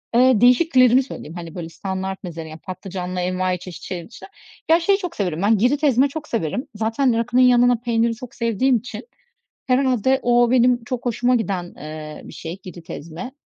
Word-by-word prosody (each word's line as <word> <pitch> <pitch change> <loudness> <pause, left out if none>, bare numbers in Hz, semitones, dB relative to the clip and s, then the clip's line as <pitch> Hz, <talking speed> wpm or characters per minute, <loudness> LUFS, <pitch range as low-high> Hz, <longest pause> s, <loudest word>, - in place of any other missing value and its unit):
Eee, 250 -2 +5
değişiklerimi 255 0 +5
söyleyeyim, 165 - -9
hani 170 -2 -8
böyle 170 -2 -6
standart 190 +2 -5
meze 170 -3 -6
ya 155 0 -9
patlıcanlı 185 0 -6
envaiçeşit 180 -3 -3
şey 175 -3 -6
dışında. 225 - -12 0.4
Ya 330 +1 +6
şeyi 390 +4 +2
çok 360 -4 -6
severim 180 -5 -2
ben, 210 +2 +3
Girit 260 +8 +1
ezme 270 -1 +4
çok 305 +2 -7
severim. 230 - -2
Zaten 225 +3 +1
rakının 245 +2 +2
yanına 245 -1 +5
peyniri 230 0 0
çok 240 +1 -11
sevdiğim 235 +3 +2
için 250 +6 -8 0.6
herhâlde 260 0 +2
o 240 0 +3
benim 245 -1 +3
çok 250 0 -5
hoşuma 245 +1 +1
giden, 195 -6 -2
eee, 155 0 -8
bir - - -11
şey 165 +4 -7
Girit 175 -1 -11
ezme. 170 - -7
230 Hz, 175 wpm, -21 LUFS, 180-255 Hz, 0.6 s, Ya